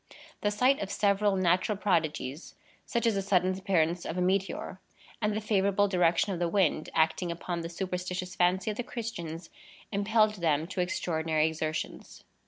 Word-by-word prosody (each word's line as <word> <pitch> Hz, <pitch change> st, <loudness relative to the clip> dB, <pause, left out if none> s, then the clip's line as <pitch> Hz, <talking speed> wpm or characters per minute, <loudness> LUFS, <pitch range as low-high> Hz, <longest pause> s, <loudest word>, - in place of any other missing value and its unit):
The 205 Hz, -, +2 dB
sight 250 Hz, +6 st, +2 dB
of 195 Hz, -, -3 dB
several 200 Hz, 0 st, +2 dB
natural 185 Hz, +3 st, +2 dB
prodigies, 160 Hz, -6 st, -1 dB, 0.3 s
such 235 Hz, 0 st, -1 dB
as 230 Hz, -, +3 dB
the 195 Hz, -, 0 dB
sudden 185 Hz, -1 st, +2 dB
appearance 180 Hz, -3 st, +1 dB
of 170 Hz, -, -4 dB
a -, -, +1 dB
meteor, 190 Hz, 0 st, -1 dB, 0.4 s
and 210 Hz, -1 st, +1 dB
the -, -, 0 dB
favorable 200 Hz, -1 st, +2 dB
direction 180 Hz, +1 st, +2 dB
of 175 Hz, -, -4 dB
the 175 Hz, -, +1 dB
wind, 165 Hz, -5 st, +1 dB
acting 160 Hz, +2 st, +2 dB
upon 170 Hz, 0 st, -4 dB
the 165 Hz, -, -5 dB
superstitious 180 Hz, 0 st, -4 dB
fancy 180 Hz, +3 st, +2 dB
of 210 Hz, -, -7 dB
the 245 Hz, -, -2 dB
Christians, 175 Hz, -9 st, -6 dB, 0.4 s
impelled 215 Hz, +1 st, +2 dB
them 155 Hz, -2 st, +2 dB
to 190 Hz, -, -2 dB
extraordinary 160 Hz, -3 st, 0 dB
exertions. 160 Hz, 0 st, -4 dB
185 Hz, 165 wpm, -29 LUFS, 170-205 Hz, 0.4 s, as